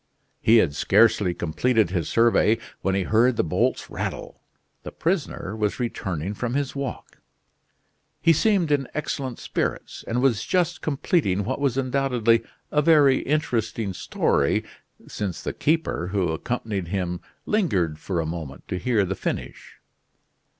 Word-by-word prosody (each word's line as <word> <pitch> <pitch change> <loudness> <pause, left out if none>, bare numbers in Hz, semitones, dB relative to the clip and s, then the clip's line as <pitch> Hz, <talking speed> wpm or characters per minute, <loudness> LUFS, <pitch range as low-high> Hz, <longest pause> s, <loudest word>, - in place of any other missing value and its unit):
He 115 +1 +6
had 85 -10 +3
scarcely 100 +1 +3
completed 105 +4 +1
his 85 -5 -1
survey, 115 -1 +4 0.2
when 95 0 0
he 95 - +1
heard 115 +6 +3
the - - +3
bolts 80 - 0
rattle: - - -5 0.4
the - - -8
prisoner 160 - -2
was 105 +1 -1
returning 95 -7 -3
from 120 +4 -3
his 140 -1 -1
walk. 140 -2 -6 1.0
He 165 - +5
seemed 185 -2 +2
in 140 -3 +1
excellent 140 -4 -3
spirits, - - -3
and 120 - 0
was 125 -5 +2
just 180 -3 0
completing 140 - 0
what 130 +7 -3
was, 135 -3 0
undoubtedly, 125 -4 +2 0.3
a 150 - +3
very 145 -4 +5
interesting 115 -8 -1
story, - - +1 0.4
since 100 -5 -4
the - - -3
keeper 155 - 0
who 95 -2 0
accompanied 100 +1 -3
him 90 -1 -2 0.2
lingered 95 - 0
for 90 +1 -2
a 80 - -1
moment 80 -4 -6
to 90 - -2
hear 115 -4 +2
the 95 - -2
finish. - - -5
115 Hz, 145 wpm, -24 LUFS, 95-140 Hz, 1.0 s, He